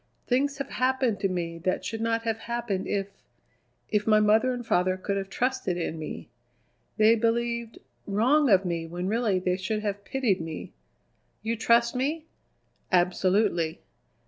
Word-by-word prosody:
Things 275 Hz, +3 st, +1 dB
have 275 Hz, -, -4 dB
happened 255 Hz, -5 st, +1 dB
to 195 Hz, -, +1 dB
me 170 Hz, -2 st, -3 dB
that 185 Hz, +2 st, -1 dB
should 225 Hz, +3 st, -4 dB
not 230 Hz, 0 st, 0 dB
have 225 Hz, -1 st, -1 dB
happened 235 Hz, -5 st, -3 dB
if 200 Hz, -1 st, -1 dB, 0.8 s
if 210 Hz, 0 st, 0 dB
my 215 Hz, -1 st, +6 dB
mother 220 Hz, +4 st, +4 dB
and 245 Hz, -1 st, -4 dB
father 185 Hz, -2 st, +2 dB
could 200 Hz, +1 st, -2 dB
have 195 Hz, -1 st, -3 dB
trusted 245 Hz, -8 st, -1 dB
in 165 Hz, -2 st, -3 dB
me. 155 Hz, -, -6 dB, 0.7 s
They 215 Hz, +1 st, +6 dB
believed 235 Hz, 0 st, 0 dB, 0.3 s
wrong 250 Hz, +8 st, +3 dB
of 195 Hz, -2 st, +5 dB
me 170 Hz, -2 st, -2 dB
when 175 Hz, +2 st, -4 dB
really 215 Hz, -2 st, +1 dB
they 180 Hz, 0 st, 0 dB
should 210 Hz, +3 st, -2 dB
have 205 Hz, -1 st, -3 dB
pitied 240 Hz, -10 st, 0 dB
me. 160 Hz, -1 st, -7 dB, 0.7 s
You 225 Hz, +1 st, -1 dB
trust 235 Hz, +1 st, +3 dB
me?" 300 Hz, +5 st, -1 dB, 0.7 s
"Absolutely." 180 Hz, -2 st, +2 dB
215 Hz, 155 wpm, -27 LUFS, 185-235 Hz, 0.8 s, my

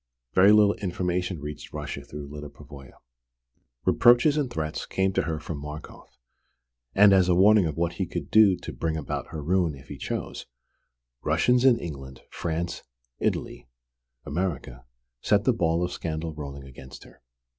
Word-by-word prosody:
Very 95 Hz, +3 st, +6 dB
little 105 Hz, -1 st, +5 dB
information 90 Hz, -2 st, -2 dB
reached 75 Hz, 0 st, -8 dB
Russia -, -, -5 dB
through 75 Hz, 0 st, -8 dB
Lyda 75 Hz, +1 st, -8 dB
Pavoya! 70 Hz, -1 st, -13 dB, 0.9 s
Reproaches 120 Hz, +5 st, +5 dB
and 145 Hz, -4 st, 0 dB
threats 80 Hz, -8 st, -4 dB
came 95 Hz, 0 st, 0 dB
to -, -, +2 dB
her 80 Hz, -1 st, -3 dB
from 75 Hz, -1 st, -6 dB
Markoff; 75 Hz, +1 st, -10 dB, 0.8 s
and 100 Hz, 0 st, +7 dB
as 95 Hz, -2 st, +4 dB
a 90 Hz, -, +4 dB
warning 100 Hz, 0 st, +5 dB
of 75 Hz, -, -5 dB
what 85 Hz, 0 st, 0 dB
he -, -, -3 dB
could -, -, -6 dB
do 105 Hz, -4 st, +6 dB
to -, -, -8 dB
bring 80 Hz, -1 st, -2 dB
about 75 Hz, -, -4 dB
her 75 Hz, -2 st, -7 dB
ruin 85 Hz, -1 st, +1 dB
if 70 Hz, +1 st, -16 dB
he -, -, -8 dB
chose, -, -, -5 dB, 0.7 s
Russians 125 Hz, 0 st, +2 dB
in 125 Hz, -3 st, +6 dB
England, 70 Hz, -, -8 dB
France, 85 Hz, 0 st, -3 dB, 0.4 s
Italy, -, -, -2 dB, 0.6 s
America, 70 Hz, -7 st, -4 dB, 0.4 s
set 100 Hz, 0 st, +2 dB
the 130 Hz, -, +3 dB
ball 85 Hz, -5 st, +1 dB
of 90 Hz, -, -5 dB
scandal 80 Hz, 0 st, -4 dB
rolling 70 Hz, -2 st, -8 dB
against 65 Hz, 0 st, -12 dB
her. -, -, -18 dB
85 Hz, 160 wpm, -26 LUFS, 75-95 Hz, 0.9 s, and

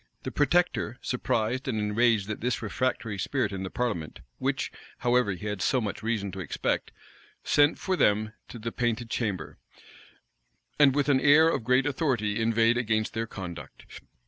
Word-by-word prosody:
The -, -, -4 dB
protector, 170 Hz, -4 st, +1 dB
surprised 125 Hz, +1 st, -1 dB
and 120 Hz, -4 st, -1 dB
enraged 105 Hz, 0 st, +2 dB
at 110 Hz, -, -5 dB
this 120 Hz, 0 st, -1 dB
refractory 110 Hz, -1 st, -2 dB
spirit 130 Hz, +6 st, -1 dB
in 95 Hz, -1 st, -4 dB
the 95 Hz, -, -4 dB
parliament, 105 Hz, -11 st, -3 dB, 0.2 s
which, 135 Hz, +1 st, -1 dB, 0.3 s
however, 120 Hz, -4 st, +2 dB
he 100 Hz, +3 st, -8 dB
had 105 Hz, -2 st, -3 dB
so 130 Hz, -, +2 dB
much 105 Hz, -4 st, -4 dB
reason 110 Hz, -3 st, -2 dB
to 95 Hz, -, -7 dB
expect, 90 Hz, -, -2 dB, 0.5 s
sent 145 Hz, +1 st, +4 dB
for 190 Hz, -, -1 dB
them 110 Hz, -, +2 dB
to -, -, -9 dB
the 115 Hz, +1 st, -5 dB
painted 120 Hz, -1 st, -2 dB
chamber, 100 Hz, -9 st, -3 dB, 1.2 s
and 140 Hz, -2 st, +6 dB
with 145 Hz, -1 st, +1 dB
an 140 Hz, -2 st, +4 dB
air 150 Hz, +3 st, +6 dB
of 135 Hz, -, -1 dB
great 125 Hz, +3 st, +3 dB
authority 125 Hz, -8 st, 0 dB
inveighed 115 Hz, +1 st, +3 dB
against 110 Hz, -2 st, 0 dB
their 115 Hz, 0 st, -2 dB
conduct. 90 Hz, -6 st, -9 dB
115 Hz, 165 wpm, -27 LUFS, 105-130 Hz, 1.2 s, and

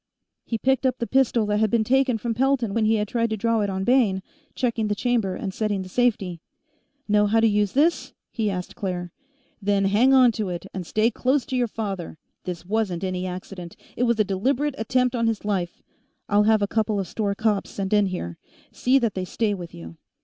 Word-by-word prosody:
He 230 Hz, -, -1 dB
picked 265 Hz, +3 st, +1 dB
up 255 Hz, -1 st, -1 dB
the 235 Hz, -, -2 dB
pistol 250 Hz, -3 st, +2 dB
that 210 Hz, 0 st, 0 dB
had 220 Hz, 0 st, +2 dB
been 230 Hz, 0 st, +2 dB
taken 260 Hz, +1 st, +2 dB
from 230 Hz, +1 st, -2 dB
Pelton 250 Hz, -3 st, +1 dB
when 225 Hz, 0 st, +1 dB
he 220 Hz, +1 st, +3 dB
had 210 Hz, -1 st, 0 dB
tried 230 Hz, +1 st, 0 dB
to 220 Hz, -, -2 dB
draw 230 Hz, +1 st, +1 dB
it 205 Hz, -, 0 dB
on 190 Hz, 0 st, -2 dB
Bayne, 220 Hz, -6 st, +2 dB, 0.3 s
checking 230 Hz, -4 st, 0 dB
the 205 Hz, -, 0 dB
chamber 225 Hz, -5 st, 0 dB
and 190 Hz, -1 st, -4 dB
setting 205 Hz, -3 st, -1 dB
the 185 Hz, -, -10 dB
safety. 195 Hz, -7 st, 0 dB, 0.7 s
"Know 210 Hz, 0 st, +3 dB
how 225 Hz, +2 st, +3 dB
to 225 Hz, -, +4 dB
use 210 Hz, -2 st, +2 dB
this?" 310 Hz, +5 st, +2 dB, 0.2 s
he 220 Hz, -3 st, -1 dB
asked 180 Hz, -2 st, -5 dB
Claire. 180 Hz, -3 st, -4 dB, 0.5 s
"Then 200 Hz, 0 st, +1 dB
hang 215 Hz, +7 st, +4 dB
onto 240 Hz, -6 st, +4 dB
it, 175 Hz, +1 st, -5 dB
and 185 Hz, -3 st, -5 dB
stay 220 Hz, +6 st, +2 dB
close 260 Hz, +4 st, +1 dB
to 260 Hz, -, -4 dB
your 245 Hz, -1 st, +1 dB
father. 195 Hz, -7 st, -5 dB, 0.3 s
This 175 Hz, -2 st, -5 dB
wasn't 195 Hz, -3 st, -1 dB
any 185 Hz, -1 st, -2 dB
accident, 180 Hz, -1 st, -7 dB, 0.2 s
it -, -, -4 dB
was 235 Hz, -2 st, +2 dB
a -, -, +5 dB
deliberate 250 Hz, +9 st, 0 dB
attempt 250 Hz, +2 st, +1 dB
on 230 Hz, -1 st, +1 dB
his 220 Hz, -2 st, -2 dB
life. 185 Hz, -4 st, -2 dB, 0.4 s
I'll 205 Hz, 0 st, +3 dB
have 215 Hz, -2 st, +4 dB
a -, -, +1 dB
couple 215 Hz, -1 st, 0 dB
of 190 Hz, -, -3 dB
store 200 Hz, +2 st, -2 dB
cops 215 Hz, -1 st, 0 dB
sent 195 Hz, 0 st, -3 dB
in 205 Hz, -1 st, +4 dB
here; 85 Hz, -, -5 dB, 0.3 s
see 255 Hz, +2 st, +2 dB
that 230 Hz, -6 st, +1 dB
they 185 Hz, -, -3 dB
stay 205 Hz, +3 st, -1 dB
with 175 Hz, -3 st, -7 dB
you." 85 Hz, -1 st, -11 dB
215 Hz, 215 wpm, -24 LUFS, 190-235 Hz, 0.7 s, a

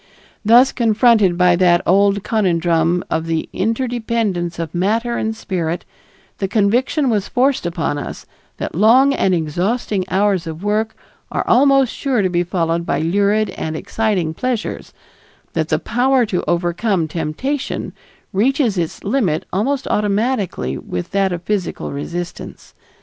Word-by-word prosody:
Thus 240 Hz, +5 st, +6 dB
confronted 220 Hz, -5 st, +3 dB
by 180 Hz, -1 st, +4 dB
that 175 Hz, -1 st, +4 dB
old 200 Hz, +2 st, +3 dB
conundrum 175 Hz, -5 st, +1 dB
of 160 Hz, +1 st, -1 dB
the 165 Hz, -1 st, -1 dB
interdependence 225 Hz, -5 st, -1 dB
of 165 Hz, -1 st, -4 dB
matter 225 Hz, +7 st, 0 dB
and 220 Hz, -1 st, -2 dB
spirit, 175 Hz, -6 st, -3 dB, 0.5 s
the 195 Hz, -, 0 dB
conviction 235 Hz, +8 st, +1 dB
was 205 Hz, -3 st, 0 dB
forced 260 Hz, -6 st, +1 dB
upon 165 Hz, -4 st, -2 dB
us -, -, -7 dB, 0.3 s
that -, -, -4 dB
long 245 Hz, -, +5 dB
and 190 Hz, -8 st, +2 dB
exhausting 185 Hz, +6 st, -1 dB
hours 195 Hz, -2 st, +1 dB
of 160 Hz, +3 st, -7 dB
work 215 Hz, +2 st, 0 dB, 0.4 s
are -, -, -2 dB
almost 275 Hz, -1 st, +4 dB
sure 260 Hz, -7 st, 0 dB
to 185 Hz, -, +1 dB
be 175 Hz, 0 st, +1 dB
followed 170 Hz, -1 st, -1 dB
by -, -, -1 dB
lurid 200 Hz, +6 st, +1 dB
and 155 Hz, 0 st, -4 dB
exciting 195 Hz, -3 st, -1 dB
pleasures; 245 Hz, +4 st, -3 dB, 0.6 s
that -, -, -1 dB
the -, -, +2 dB
power 255 Hz, +1 st, +2 dB
to 185 Hz, -4 st, -2 dB
overcome 175 Hz, +1 st, 0 dB
temptation 170 Hz, -, -3 dB, 0.4 s
reaches 230 Hz, -, +1 dB
its 165 Hz, -2 st, -4 dB
limit 200 Hz, -, 0 dB
almost 255 Hz, +8 st, 0 dB
automatically 205 Hz, -, -1 dB
with 90 Hz, -, -5 dB
that 195 Hz, -1 st, +1 dB
of 175 Hz, -1 st, -4 dB
physical 195 Hz, -3 st, -2 dB
resistance. 175 Hz, +5 st, -6 dB
200 Hz, 140 wpm, -18 LUFS, 175-230 Hz, 0.6 s, Thus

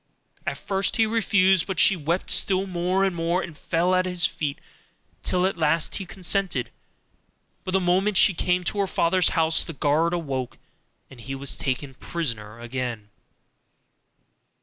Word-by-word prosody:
At -, -, -2 dB
first 195 Hz, -1 st, -1 dB
he 225 Hz, -, +3 dB
refused, 195 Hz, -5 st, +2 dB
but 190 Hz, -3 st, -2 dB
she 195 Hz, -, +6 dB
wept 170 Hz, +2 st, -2 dB
still 190 Hz, 0 st, +2 dB
more 180 Hz, +1 st, 0 dB
and 190 Hz, -2 st, 0 dB
more, 170 Hz, +2 st, 0 dB
and 170 Hz, -4 st, -8 dB
fell 170 Hz, +4 st, 0 dB
at 185 Hz, 0 st, +2 dB
his 180 Hz, -1 st, +2 dB
feet, 145 Hz, -5 st, -2 dB, 0.6 s
till 180 Hz, 0 st, +1 dB
at 190 Hz, -2 st, -1 dB
last 155 Hz, 0 st, +1 dB
he 195 Hz, -, -6 dB
consented; 180 Hz, -, -1 dB, 0.9 s
but 185 Hz, -, -4 dB
the 190 Hz, -, +4 dB
moment 190 Hz, +3 st, +1 dB
she 195 Hz, -, +6 dB
came 180 Hz, +1 st, 0 dB
to 200 Hz, +3 st, -2 dB
her 200 Hz, -, +1 dB
father's 180 Hz, 0 st, +2 dB
house 160 Hz, 0 st, +3 dB
the 165 Hz, -, -7 dB
guards 155 Hz, +4 st, +1 dB
awoke 135 Hz, -7 st, -4 dB, 0.5 s
and 125 Hz, -3 st, -12 dB
he 135 Hz, +4 st, -5 dB
was 135 Hz, 0 st, -2 dB
taken 135 Hz, 0 st, -3 dB
prisoner 115 Hz, -8 st, -5 dB
again. 120 Hz, -3 st, -5 dB
175 Hz, 160 wpm, -24 LUFS, 145-185 Hz, 0.9 s, she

